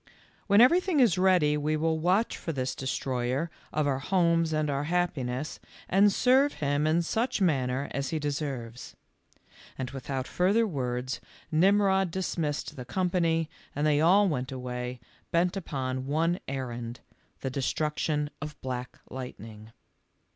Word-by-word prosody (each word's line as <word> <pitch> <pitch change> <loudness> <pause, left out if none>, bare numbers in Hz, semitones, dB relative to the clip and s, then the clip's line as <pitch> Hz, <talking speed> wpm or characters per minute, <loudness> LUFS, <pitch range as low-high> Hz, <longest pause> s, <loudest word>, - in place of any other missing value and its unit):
cr 200 - 0
TThen 210 - +8
everything 345 +5 +4
is 220 -8 +4
read}' 180 -6 +4
we 155 +1 0
will 160 +1 0
watch 185 +7 +2
for 165 - -4
this 130 -3 -2
destroyer 130 +3 -2 0.2
of 155 -1 0
our 135 -2 0
homes 170 0 +2
and 155 -1 +1
our 140 0 -1
happi 175 -4 0
ness, 125 +5 -4 0.3
and 200 +2 +5
serve 265 +6 +4
him 145 +1 0
in 165 +2 +2
such 235 +8 0
manner 135 -6 +1
as 140 -1 -2
he 160 - -1
de 150 -1 -1
serves." 130 -5 -5 0.8
And 130 -1 -4
without 135 0 -4
further 200 +6 +2
words 125 - -3 0.3
Ximrod 190 +2 +4
dismissed 165 -4 -2
the 125 - -5
company 170 -1 +1 0.3
and 145 +2 0
they 150 -1 +3
all 195 +5 +5
went 130 -6 -2
away, 125 -1 -5 0.3
bent 175 +2 +2
upon 130 -7 -3
one 165 +5 +1
errand 120 -3 -5 0.2
— - - -39
the 135 - -3
destruction 150 +2 -1
of 150 -1 -6
Black 125 -1 -5
Lightning. 115 -4 -8
150 Hz, 150 wpm, -28 LUFS, 130-180 Hz, 0.8 s, TThen